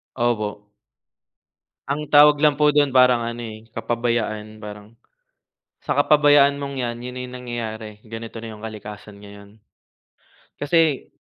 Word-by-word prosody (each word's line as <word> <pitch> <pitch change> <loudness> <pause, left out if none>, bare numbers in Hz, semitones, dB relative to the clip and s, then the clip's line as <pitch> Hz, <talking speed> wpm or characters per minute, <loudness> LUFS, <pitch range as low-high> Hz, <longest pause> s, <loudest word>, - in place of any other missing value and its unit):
Opo. 105 -3 -2 1.2
Ang 150 +2 -2
tawag 145 0 +8
lang 150 -1 +2
po 150 - +6
doon 145 -2 +2
parang 125 -2 +5
ano 115 +1 -5
eh, 110 -1 -9
kapabayaan 115 -2 -2
parang, 105 +1 -10 0.9
sa - - -3
kapabayaan 145 -1 +5
mong 140 -1 -5
'yan, 120 -1 -3
'yon 125 +1 -7
na 125 - -6
'yong 125 0 -8
nangyayari. 115 -3 -6
Ganito 115 0 -9
na 115 - -7
'yong 110 0 -11
kalikasan 105 -1 -10
ngayon. 100 0 -13 1.1
Kasi 155 -1 +1
120 Hz, 135 wpm, -22 LUFS, 110-140 Hz, 1.2 s, tawag